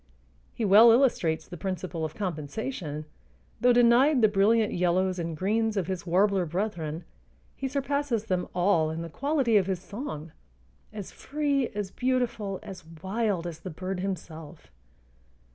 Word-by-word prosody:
He 230 - -1
well 215 +4 +8
illustrates 225 -10 +2
the 175 - -8
principle 185 -3 -3
of 155 0 -4
compensation: 160 - -4 0.5
though 245 - +5
denied 245 +3 +5
the - - +8
brilliant 210 +2 +3
yellows 180 +1 +1
and 165 -2 -4
greens 220 +3 0
of 190 - 0
his 185 0 -5
warbler 190 +2 +3
brethren, 170 -3 -3 0.5
he 270 - -3
surpasses 280 -4 -1
them 185 -4 -1
all 175 -3 +3
in 160 +1 -4
the 165 - -7
quality 270 - +1
of 195 -2 +2
his 190 -2 -1
song, 180 - -7 0.6
as 205 -3 -7
free, 280 -3 -1
as 205 -2 -3
beautiful, 245 -6 -1
as 185 -2 -9 0.2
wild 200 -3 -1
as 170 -2 -6
the 185 - -7
bird 185 +3 -4
himself. 165 -4 -6
195 Hz, 145 wpm, -27 LUFS, 175-230 Hz, 0.6 s, well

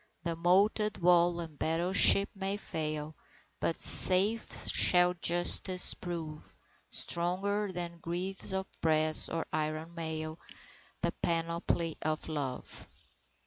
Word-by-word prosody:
The 170 -1 -2
moated 200 +5 +1
wall 175 -1 +3
and 160 -4 -9
battleship 180 +4 +4
may 195 +1 -3
fail, 155 -5 -4 0.5
But 165 - 0
safe 200 +5 +2
shall 180 0 +4
Justice 175 +1 +3
prove; 160 -4 -8 0.3
Stronger 195 +4 -1
than 170 -1 -6
greaves 180 +4 -4
of 190 0 -3 0.2
brass 155 -1 +3
or 165 0 -4
iron 155 +2 -3
mail, 160 -1 -5 0.6
The - - +1
panoply 170 0 -1
of 155 0 -3
Love. 140 -5 -6
170 Hz, 105 wpm, -30 LUFS, 160-185 Hz, 0.6 s, battleship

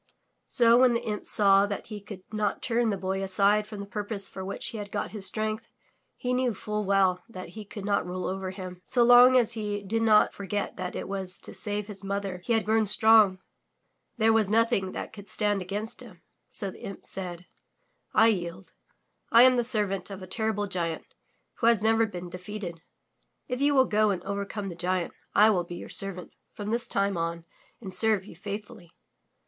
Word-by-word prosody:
So, 235 0 +5
when 250 -2 +5
the 235 - -2
imp 210 -3 -4
saw 200 -1 +5
that 200 -1 -5
he 210 -2 -8
could 200 -2 -10
not 210 -2 -1
turn 235 -1 +1
the 200 - -1
Boy 190 +1 -2
aside 200 +2 +2
from 210 -2 -7
the - - -6
purpose 205 0 -5
for 190 - -8
which 195 - -3
he 225 - -6
had 205 -1 -7
got 205 - -3
his 205 -3 0
strength, 215 +3 -2 0.5
he 250 0 -2
knew 250 -3 0
full 210 +2 -3
well 190 -2 +2
that 185 -6 -8
he 215 +4 -9
could 205 0 -8
not 205 -1 +1
rule 185 0 -4
over 190 0 -3
him. 185 -1 -8
So 245 - +2
long 245 +2 +8
as 235 -2 +2
he 210 -2 -3
did 225 +3 -1
not 215 -2 +4
for 200 - -8
get 205 +1 -2
that 180 -1 -5
it - - -5
was 190 -2 -4
to - - -8
save 205 -1 -3
his 205 -1 -5
mother 195 -2 -3
he 235 - 0
had 225 -1 +1
grown 220 0 +3
strong, 215 -2 +6 0.8
there 225 0 +4
was 220 -3 +2
nothing 220 -3 +1
that - - -6
could 205 -2 -11
stand 205 -2 0
against 205 +4 -5
him. - - -14 0.3
So 200 -3 -2
the - - -15
imp 195 - -8
said: 180 -2 -5 0.7
I 225 +1 +5
yield. 175 -3 -4 0.6
I 235 +1 +8
am 255 0 +6
the 240 - +1
servant 210 -6 0
of 195 -1 -8
a - - -6
terrible 220 +1 -1
giant 170 -4 -3 0.5
who 230 - +2
has 230 -3 +4
never 225 0 +3
been 180 -3 -7
defeated. 180 -2 -7 0.7
If 250 0 -3
you 285 0 +3
will 260 -1 +5
go 215 -2 +2
and 185 -3 -2
overcome 200 0 -4
the 175 - -7
giant, 180 0 -2 0.2
I 215 +2 +6
will 180 -4 +1
be 175 0 -8
your - - -9
servant 190 -3 -2 0.2
from 210 -1 -5
this 235 +1 0
time 200 -3 0
on 165 0 -3 0.3
and 190 -5 -8
serve 200 0 +2
you 200 - -12
faithfully." 200 -2 -8
205 Hz, 205 wpm, -27 LUFS, 190-220 Hz, 0.8 s, long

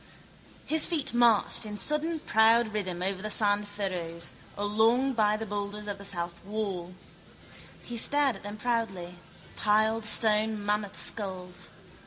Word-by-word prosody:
His 315 0 +4
feet 310 -8 +1
marched 235 -3 +3
in 210 -1 -3
sudden 305 +6 0
proud 225 -4 +3
rhythm 185 -4 -3
over 190 0 -1
the 215 - -4
sand 205 -1 +2
furrows, 180 -5 -3 0.3
along 225 +6 +2
by 215 -2 +2
the 225 - -5
boulders 205 0 -4
of 200 -1 -4
the 200 - -8
south 175 -3 -4
wall. 190 -4 -4 0.9
He 240 - -6
stared 285 +2 +3
at - - -15
them 205 +1 -7
proudly, 195 -7 -3 0.4
piled 220 +1 +2
stone 215 -1 +1
mammoth 205 -1 -1
skulls. 185 -4 -5
210 Hz, 140 wpm, -28 LUFS, 195-225 Hz, 0.9 s, His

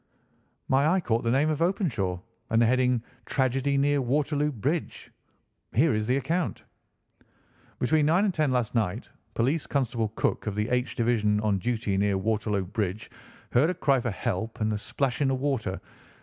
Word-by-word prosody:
"My 135 +3 +3
eye 185 +4 +3
caught 115 -9 0
the 115 - 0
name 140 +6 +2
of 155 - -2
Openshaw, 130 - 0 0.3
and 115 - +3
the 120 - +5
heading 125 0 +2 0.2
'Tragedy 135 +1 +1
Near 140 0 +2
Waterloo 145 +3 0
Bridge.' 145 - -3 0.6
Here 150 +6 +4
is 110 0 -1
the 125 +2 +2
account: 165 +5 -2 1.1
"'Between 150 +3 +2
nine 175 +6 +3
and 195 - +1
ten 155 -4 +1
last 125 -3 0
night 110 -7 -1 0.2
Police 140 +7 0
Constable 120 -5 0
Cook, - - -1
of 105 - -2
the 105 +3 -1
H 125 +1 0
Division, 110 -3 +2
on 105 -3 +1
duty 110 -2 -1
near 100 0 +2
Waterloo 105 -1 -1
Bridge, 105 0 -3 0.4
heard 140 +7 +4
a 180 - -1
cry 140 -6 +2
for 120 - -2
help 110 +2 -3
and 110 0 0
a - - -1
splash 135 +4 -2
in 140 - +3
the 135 - +1
water. 130 -9 -2
125 Hz, 175 wpm, -27 LUFS, 110-145 Hz, 1.1 s, the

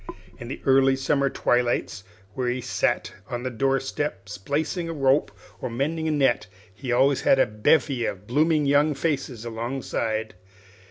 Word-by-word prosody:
In 120 - -7
the 130 - -6
early 135 0 +5
summer 140 +1 +1
twilights, 120 -7 0 0.3
when 125 +1 -1
he 125 - -2
sat 125 - -1 0.2
on 120 -1 -4
the 130 - -3
door 135 +3 +1
step 135 -6 -4
splicing 145 - -2
a - - -3
rope 135 -1 +2 0.3
or - - -3
mending 155 +7 -2
a - - +1
net, 135 -9 +2 0.3
he 125 +5 -5
always 135 +3 +3
had - - +4
a - - +5
bevy 120 +4 +1
of 100 +1 -6
blooming 150 +5 +2
young 145 +2 +3
faces 135 -6 -2
alongside. 115 -2 -3
135 Hz, 160 wpm, -25 LUFS, 120-145 Hz, 0.3 s, early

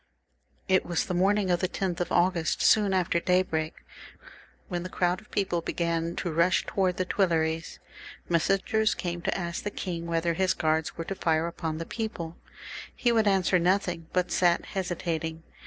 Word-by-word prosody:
It 185 0 +3
was 170 -2 -1
the - - -3
morning 190 +1 +2
of 175 - +2
the 185 - 0
10th 180 -3 -2
of 175 - -2
August, 175 -2 +2
soon 210 -2 +5
after 180 -2 +1
daybreak, 170 -3 0 0.8
when 175 -2 -3
the 185 - -6
crowd 180 0 0
of 215 - -21
people 190 -4 0
began 170 0 -1
to 175 - -2
rush 170 +3 +3
towards 185 -2 0
the 185 - 0
Tuileries. 165 -4 0 0.5
Messengers 195 +5 +2
came 175 -1 -4
to - - -1
ask 170 -2 -3
the 205 - -3
king 170 -4 -5
whether 170 0 0
his 190 +2 +1
guards 160 +1 0
were 165 - -4
to 195 - -3
fire 165 -3 +1
against 160 -2 -4
the 165 - -4
people. 195 -8 -5 0.6
He 240 - +2
would 220 -2 +3
answer 190 -2 +3
nothing, 175 -2 0
but 180 -1 0
sat 175 -1 +3
hesitating. 165 -4 -3
175 Hz, 170 wpm, -28 LUFS, 165-190 Hz, 0.8 s, soon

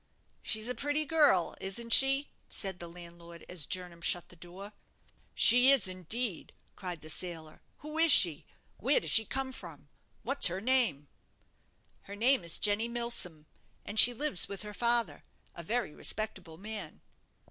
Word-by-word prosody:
"She's 220 0 -3
a 250 - -1
pretty 290 +3 -2
girl, 295 - +1
isn't 230 +5 -4
she?" 275 +1 +3 0.2
said 190 -3 -1
the 170 - -9
landlord, 170 0 -13
as 175 -6 +1
Jernam 180 -2 -5
shut 175 0 -1
the - - -17
door. 180 +4 -12 0.6
"She 250 +2 +8
is, 270 -8 +4
indeed!" 185 +3 -4 0.2
cried 180 -4 -8
the 155 - -11
sailor. 160 -3 -6 0.2
"Who 305 +1 -6
is 330 -1 +4
she? 170 - +5 0.3
where - - +1
does - - -4
she 225 - +5
come 265 +4 -5
from? 165 - -12 0.3
what's 275 0 +3
her 180 +2 -4
name?" 225 - 0 1.0
"Her 200 - -10
name 240 0 +1
is 170 -1 -1
Jenny 210 +2 0
Milsom, 235 -10 -3 0.4
and 210 - 0
she 245 - +9
lives 255 -5 -2
with 200 0 -6
her 210 0 -9
father, 235 +1 -1 0.3
a - - -10
very 220 -2 -3
respectable 210 -6 -4
man." 205 -3 -8
205 Hz, 160 wpm, -30 LUFS, 175-245 Hz, 1.0 s, she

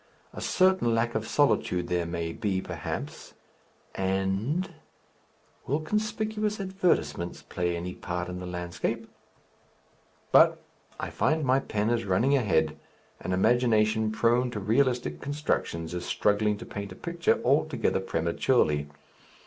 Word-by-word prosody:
A - - -7
certain 185 -11 +3
lack 115 +1 +1
of 110 0 -2
solitude 115 -10 +2
there 85 -1 0
may 85 -1 -3
be 100 -3 -1
perhaps, - - -6 0.6
and 95 - -1 0.9
Will 145 +3 +1
conspicuous 215 +4 -1
advertisements 185 - 0
play 85 -1 -2
any 90 +2 -4
part 90 0 -4
in 90 0 -5
the 90 - -6
landscape?... 90 0 -3 1.2
But - - +6 0.4
I - - -4
find 155 -1 +1
my 130 +1 +4
pen 110 -4 -1
is 115 -2 0
running 110 +9 +3
ahead, 80 - +1 0.4
an - - -4
imagination 110 +1 +3
prone 120 +3 +2
to 115 -4 -4
realistic 115 - +1
constructions 135 - -2
is 90 0 -3
struggling 105 +2 +1
to - - -9
paint 100 -1 -6
a - - -8
picture 170 - 0
altogether 140 -1 +2
prematurely. 80 - +1
110 Hz, 125 wpm, -28 LUFS, 90-140 Hz, 1.2 s, But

